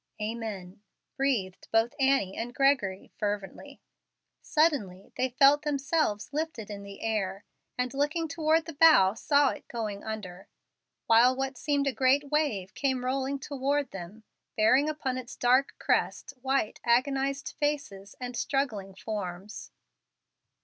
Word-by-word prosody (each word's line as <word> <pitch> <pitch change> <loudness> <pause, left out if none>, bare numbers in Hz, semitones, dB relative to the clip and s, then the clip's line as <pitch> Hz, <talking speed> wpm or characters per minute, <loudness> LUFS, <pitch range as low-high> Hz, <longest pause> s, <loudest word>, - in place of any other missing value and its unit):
"Amen!" 210 -4 -5 0.3
breathed 240 -10 -1
both 225 +1 +2
Annie 265 -8 +2
and 240 +2 -5
Gregory, 260 -9 +1
fervently. 205 -2 -4 0.6
Suddenly 270 - 0
they 260 - 0
felt 275 +3 +5
themselves 285 -6 -1
lifted 290 -9 -3
in 200 -1 -6
the 200 0 -10
air, 205 -3 -2 0.3
and, 250 0 -1
looking 295 +4 0
toward 315 +1 +1
the 330 - -7
bow, 285 -11 +6
saw 285 +4 +3
it - - -7
going 215 -4 -4
under, 195 -4 -7 0.6
while 235 +3 +5
what 270 0 -3
seemed 285 +2 0
a 275 - 0
great 275 +3 +2
wave 225 -11 0
came 260 -3 -1
rolling 270 +2 -1
toward 280 0 -2
them, 195 +4 -9 0.3
bearing 255 +7 +4
upon 265 -4 -2
its 245 -2 -9
dark 255 +3 +2
crest - - 0
white, 265 -4 0
agonized 270 +3 +1
faces 280 -10 -3
and 250 -1 -5
struggling 225 -8 -2
forms. 200 -1 -6
255 Hz, 130 wpm, -28 LUFS, 210-280 Hz, 0.6 s, bow